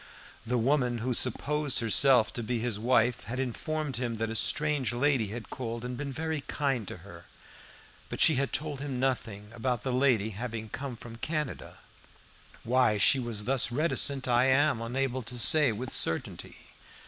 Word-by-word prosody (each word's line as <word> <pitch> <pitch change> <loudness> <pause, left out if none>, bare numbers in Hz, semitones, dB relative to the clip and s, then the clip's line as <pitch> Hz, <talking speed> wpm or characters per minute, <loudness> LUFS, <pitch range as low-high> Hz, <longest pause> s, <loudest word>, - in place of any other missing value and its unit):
The 125 +1 0
woman 125 0 +1
who 125 +2 -2
supposed 140 +4 0
herself 120 0 +4
to 120 - -4
be 120 +2 -2
his 115 -2 -2
wife 120 +1 +1
had 125 +3 -5
informed 145 +3 -3
him 120 -2 -3
that 110 0 -2
a - - -5
strange 150 +1 0
lady 130 -3 +1
had 110 +3 -8
called 115 -1 -5
and 125 0 -4
been 140 +2 -5
very 160 +1 -3
kind 135 -8 -1
to - - -6
her, 85 -3 -12 0.8
but - - -6
she 160 - +6
had 140 0 -1
told 150 -2 -3
him 140 -3 -4
nothing 115 -5 -2
about 120 0 -2
the 130 - -2
lady 125 -5 +2
having 110 +1 -6
come 130 +1 -6
from 115 0 -11
Canada. 150 +3 -4 0.9
Why 125 -3 +2
she 130 +6 +5
was 115 -4 -3
thus 130 0 +1
reticent 140 -1 +1
I 120 +1 +3
am 135 -1 +2
unable 130 +2 -2
to 120 +1 -6
say 120 +5 +5
with 125 +5 -5
certainty. 80 - 0
125 Hz, 170 wpm, -29 LUFS, 115-135 Hz, 0.9 s, she